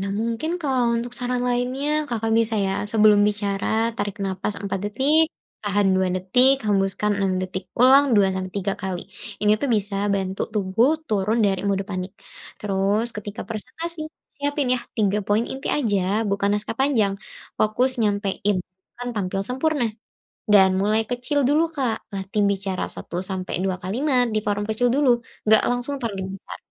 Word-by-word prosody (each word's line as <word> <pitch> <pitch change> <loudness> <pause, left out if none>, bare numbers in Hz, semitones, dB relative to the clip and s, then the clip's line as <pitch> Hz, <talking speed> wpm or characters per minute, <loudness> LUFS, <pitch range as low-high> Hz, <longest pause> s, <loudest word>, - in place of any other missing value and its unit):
nah 195 - -3
mungkin 230 +7 -2
kalau 250 -4 +1
untuk 240 +1 -4
saran 250 0 -1
lainnya 270 +5 -1
Kakak 225 -2 -1
bisa 225 0 +1
ya 190 - 0 0.2
sebelum 210 -2 +6
bicara 210 +2 -1
tarik 205 -1 -3
napas 190 +2 -2
4 195 -1 -3
detik, 295 +9 +3 0.3
tahan 205 -1 +2
2 185 0 +2
detik, 250 +8 +3
hembuskan 205 0 +1
6 195 -1 +1
detik, 185 0 -5
ulang 265 0 +6
2 200 - +6
sampai 185 0 -3
3 195 0 -1
kali. 190 -2 -3 0.4
Ini 210 0 +4
tuh 280 - -1
bisa 205 -1 -2 0.2
bantu 190 -1 -2
tubuh 210 +6 +2 0.2
turun 215 +1 0
dari 195 -2 +1
mode 195 0 0
panik, 185 0 -4 0.5
terus 205 +3 0
ketika 210 0 -6
presentasi 310 +9 -4 0.2
siapin 285 -2 -1
yah, 245 - -3
3 210 -2 +2
poin 210 +3 +2
inti 265 +2 -6
aja, 205 -4 +1
bukan 200 0 +1
naskah 210 +2 -4
panjang, 245 -8 +2 0.5
fokus 230 +5 +2
nyampein, 205 -1 0
bukan 190 +7 -11
tampil 195 -2 -2
sempurna, 265 +4 0 0.7
dan 190 -2 +6
mulai 215 +2 +2
kecil 250 +3 0
dulu, 310 +4 +3
Kak, 255 -9 -2
latih 195 +1 -2
bicara 195 -2 -1
1 175 +1 -5
sampai 185 -1 -3
2 190 -1 -1
kalimat 250 +7 +1
di 215 - +1
forum 205 0 0
kecil 220 +3 +1
dulu, 255 -3 +3 0.2
gak 220 0 +6
langsung 245 +3 -2
forum 225 -5 -3 0.2
besar, 195 - -9
215 Hz, 160 wpm, -23 LUFS, 195-250 Hz, 0.7 s, sebelum